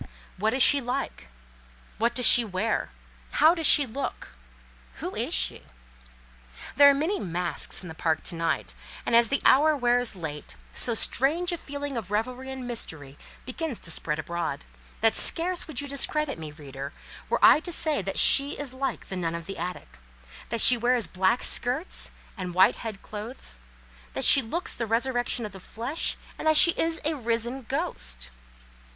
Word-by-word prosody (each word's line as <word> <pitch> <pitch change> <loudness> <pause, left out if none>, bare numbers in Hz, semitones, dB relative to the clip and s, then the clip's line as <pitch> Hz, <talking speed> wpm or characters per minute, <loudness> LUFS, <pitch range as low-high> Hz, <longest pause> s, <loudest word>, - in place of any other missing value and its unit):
What 215 +5 -1
is 260 - +5
she 285 -1 +6
like? 250 - -5 0.7
What 235 +2 0
does 250 -1 0
she 245 - +8
wear? 210 +1 -3 0.4
How 315 +2 +5
does 330 -3 +3
she 290 - +8
look? 265 +3 -6 0.7
Who - - -6
is - - -3
she? 60 0 0 1.1
There 285 0 +7
are - - +4
many 325 +9 -2
masks 175 +1 -2
in - - -9
the 160 - -8
park 160 -1 -2
to - - -2
night, 165 0 -2 0.3
and - - +1
as 235 0 +6
the 275 - -1
hour 300 +3 +4
wears 245 -3 +1
late, 155 -4 -7 0.2
so 235 - 0
strange 320 +11 +2
a 345 - -3
feeling 285 -2 -6
of 210 -5 -6
revelry 250 +5 -3
and 260 -1 -7
mystery 155 - -5 0.3
begins 265 0 -5
to 165 - -1
spread 150 -1 -1
abroad, 170 - -5 0.4
that 225 0 +3
scarce 350 +2 0
would 290 -4 -4
you 285 - -6
discredit 280 - -1
me, 155 -2 -8
reader, 140 -2 -9 0.4
were - - +1
I - - +7
to 335 +3 -8
say 310 -6 -1
that 195 +1 -5
she 280 +2 +7
is 285 -3 -5
like 270 +1 -4
the 190 - -6
nun 170 -2 -3
of 170 -1 -7
the 195 -1 -8
attic, 175 - -7 0.5
that 230 -1 +1
she 250 - +8
wears 240 -1 +1
black 190 +5 0
skirts 265 +9 0 0.3
and 180 -4 -7
white 185 +1 +4
head 215 -3 -8
clothes, 210 - -9 0.5
that - - 0
she 275 - +9
looks 325 +11 -4
the 230 - -5
resurrection 245 +1 -1
of 210 - -8
the 190 - -12
flesh, 235 - -3 0.2
and - - -3
that 315 -1 +5
she 340 - +8
is 330 0 -2
a 315 - 0
risen 235 0 -3
ghost. - - -4
235 Hz, 180 wpm, -25 LUFS, 185-280 Hz, 1.1 s, she